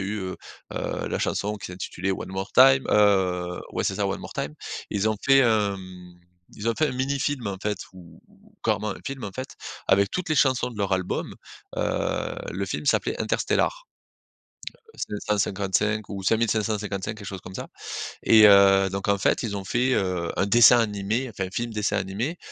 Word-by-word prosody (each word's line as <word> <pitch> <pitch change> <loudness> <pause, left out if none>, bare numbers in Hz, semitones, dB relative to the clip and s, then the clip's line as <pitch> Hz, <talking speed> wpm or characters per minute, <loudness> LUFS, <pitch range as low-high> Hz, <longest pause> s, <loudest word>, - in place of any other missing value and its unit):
a 95 - -3
eu, 105 +1 -3
heu 95 -1 -5 0.4
heu, - - -3
la - - -2
chanson 105 +1 -1
qui 100 - -8
s'intitulait 90 +1 -3
One - - -5
More 95 +1 -5
Time, 130 +1 +7
heu, 90 -4 +2
ouais, - - -1
c'est - - -1
ça - - 0
One - - -3
More - - -9
Time. 75 - -3 0.4
Ils 105 +2 +1
ont 110 - 0
fait, 135 0 +5
hem, 100 -7 0 0.4
ils 105 +2 -3
ont 115 - +1
fait 155 - +3
un - - -3
mini 135 +2 -1
film, 135 -5 -2
en 95 - -4
fait, 105 -2 -2
ou 85 -3 -15
ou - - -24
carrément 105 0 0
un - - -7
film, 135 -2 -5
en 100 - -6
fait, 130 0 -5 0.4
avec 100 +1 +4
toutes 180 -1 -3
les 155 - +1
chansons 130 -3 +2
de 110 - -10
leur 100 -1 -1
album, 95 -1 -2 0.4
heu, - - -1 0.2
le 100 +2 -3
film 95 - -4
s'appelait - - +1
Interstella - - 0 1.1
555 105 0 -1
ou 100 -2 -6
5555 105 -1 0
quelque 105 -2 -10
chose 95 -2 -6
comme 95 - -11
ça - - -6 0.6
et 110 -1 +7
heu, 100 -1 +6
donc, 100 +1 -4
en 100 0 +3
fait, 100 - +1
ils 100 -3 -2
ont 100 - -5
fait, 125 +7 +1
heu, 90 -4 -1
un 95 - +2
dessin 120 +3 +7
animé, 110 +3 -1
enfin, 95 -4 -4
un - - -12
film 120 +3 -3
dessin 105 -1 0
animé 105 - -3
105 Hz, 195 wpm, -25 LUFS, 95-115 Hz, 1.1 s, Time